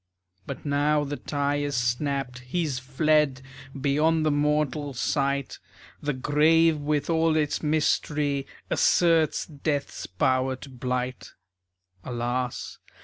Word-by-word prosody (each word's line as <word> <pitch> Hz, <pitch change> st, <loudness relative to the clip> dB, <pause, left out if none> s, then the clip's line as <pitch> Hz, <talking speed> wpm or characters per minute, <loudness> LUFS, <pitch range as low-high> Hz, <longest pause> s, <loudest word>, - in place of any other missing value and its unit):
But -, -, -7 dB
now 145 Hz, +1 st, +2 dB
the 145 Hz, 0 st, -3 dB
tie 145 Hz, +2 st, -1 dB
is 145 Hz, -1 st, -2 dB
snapped. 125 Hz, +1 st, -1 dB
He's 135 Hz, +2 st, -2 dB
fled 140 Hz, 0 st, +1 dB, 0.4 s
Beyond 155 Hz, +3 st, +2 dB
the 155 Hz, -, +3 dB
mortal 145 Hz, -1 st, 0 dB
sight. 140 Hz, +1 st, -1 dB, 0.4 s
The 145 Hz, -, -1 dB
grave 155 Hz, +4 st, +3 dB
with 145 Hz, 0 st, -1 dB
all 165 Hz, -1 st, +2 dB
its 150 Hz, -2 st, 0 dB
mystery 150 Hz, -2 st, 0 dB, 0.2 s
Asserts 165 Hz, -3 st, +3 dB
Death's 145 Hz, -1 st, -3 dB
power 130 Hz, +7 st, +1 dB
to 135 Hz, +2 st, -11 dB
blight. 125 Hz, 0 st, -3 dB, 0.7 s
Alas! 125 Hz, 0 st, -3 dB
145 Hz, 110 wpm, -26 LUFS, 130-150 Hz, 0.7 s, the